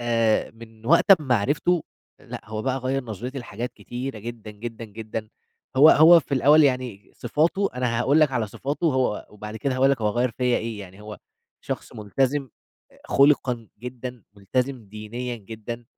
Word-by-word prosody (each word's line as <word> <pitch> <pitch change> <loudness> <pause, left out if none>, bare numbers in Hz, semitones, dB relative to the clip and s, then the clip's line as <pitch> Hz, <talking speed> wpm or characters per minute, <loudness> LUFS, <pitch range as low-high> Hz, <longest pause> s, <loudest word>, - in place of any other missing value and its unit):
آآ 115 -2 +1
من 115 -1 -14
وقت 170 - +4
أمّا 130 -4 +2
عرفته 150 - +1 0.4
لأ، - - -8
هو 110 0 -5
بقى 130 0 -1
غيّر 130 +1 -2
نظرتي 120 +5 -6
لحاجات 120 0 -6
كتيرة 125 -1 -6
جدًا، 115 0 -8
جدًا، 115 +2 -7
جدًا. 110 0 -6 0.5
هو 150 +4 +9
هو 165 +2 +8
في 140 - -3
الأول 150 +4 +6
يعني 125 -7 -1
صفاته 165 - 0
أنا 125 -2 -1
هاقول 140 +6 +3
لك 150 -3 +4
على 120 -3 0
صفاته 140 +10 -3
وهو 130 -7 0
وبعد 105 +1 -8
كده 130 +4 -1
هاقول 135 +2 +4
لك 135 - 0
هو 105 - +2
غيّر 120 +3 0
فيّا 125 +1 0
إيه. 115 -2 -5
يعني 95 0 -11
هو 105 0 -9 0.4
شخص - - -5
ملتزم 130 +6 -1 0.6
خلقًا 135 -5 +3
جدًا، 125 -1 -7
ملتزم 125 +4 -2
دينيًا 110 +4 -6
جدًا، 115 +2 -8
120 Hz, 165 wpm, -24 LUFS, 110-135 Hz, 0.6 s, هو